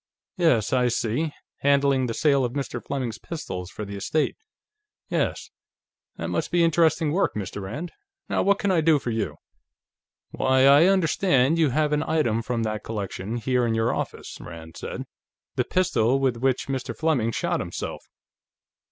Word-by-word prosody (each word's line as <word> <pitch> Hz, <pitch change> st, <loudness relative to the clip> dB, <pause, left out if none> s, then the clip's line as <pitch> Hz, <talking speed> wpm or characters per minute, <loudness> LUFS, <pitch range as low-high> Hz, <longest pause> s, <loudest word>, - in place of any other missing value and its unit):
"Yes, 160 Hz, -, +2 dB
I 125 Hz, -1 st, +3 dB
see; 120 Hz, +6 st, 0 dB, 0.3 s
handling 140 Hz, -2 st, +3 dB
the 115 Hz, -, -3 dB
sale 140 Hz, -3 st, +3 dB
of 120 Hz, -1 st, -2 dB
Mr. 135 Hz, -4 st, -4 dB
Fleming's 130 Hz, -6 st, -3 dB
pistols, 95 Hz, -, -6 dB
for 105 Hz, -, -6 dB
the 100 Hz, 0 st, -7 dB
estate. 145 Hz, +10 st, 0 dB, 0.7 s
Yes. -, -, -1 dB, 0.7 s
That -, -, -4 dB
must -, -, -1 dB
be 175 Hz, -1 st, +3 dB
interesting 165 Hz, -1 st, +3 dB
work, 190 Hz, +5 st, +1 dB
Mr. 100 Hz, -1 st, -4 dB
Rand. 140 Hz, -, -5 dB, 0.4 s
Now, -, -, 0 dB
what 200 Hz, 0 st, +3 dB
can 200 Hz, -2 st, 0 dB
I 170 Hz, -3 st, +3 dB
do 155 Hz, -1 st, +5 dB
for 125 Hz, -4 st, -3 dB
you?" 105 Hz, -9 st, -2 dB, 1.0 s
"Why, 130 Hz, 0 st, +3 dB
I 140 Hz, +4 st, +7 dB
understand 165 Hz, -5 st, +3 dB
you 155 Hz, -3 st, +4 dB
have 150 Hz, +3 st, +1 dB
an 150 Hz, -, +2 dB
item 150 Hz, -9 st, +1 dB
from 115 Hz, 0 st, -2 dB
that 110 Hz, -1 st, -3 dB
collection, 105 Hz, 0 st, -4 dB
here 125 Hz, +1 st, +1 dB
in 115 Hz, -1 st, +1 dB
your 115 Hz, +1 st, +1 dB
office," -, -, -5 dB
Rand 80 Hz, -1 st, -10 dB
said. -, -, -5 dB, 0.5 s
"The -, -, +1 dB
pistol 135 Hz, -8 st, +2 dB
with 130 Hz, -3 st, +1 dB
which 130 Hz, +1 st, 0 dB
Mr. 130 Hz, -4 st, -3 dB
Fleming 145 Hz, -8 st, +1 dB
shot -, -, -1 dB
himself. -, -, -5 dB
130 Hz, 165 wpm, -25 LUFS, 115-155 Hz, 1.0 s, I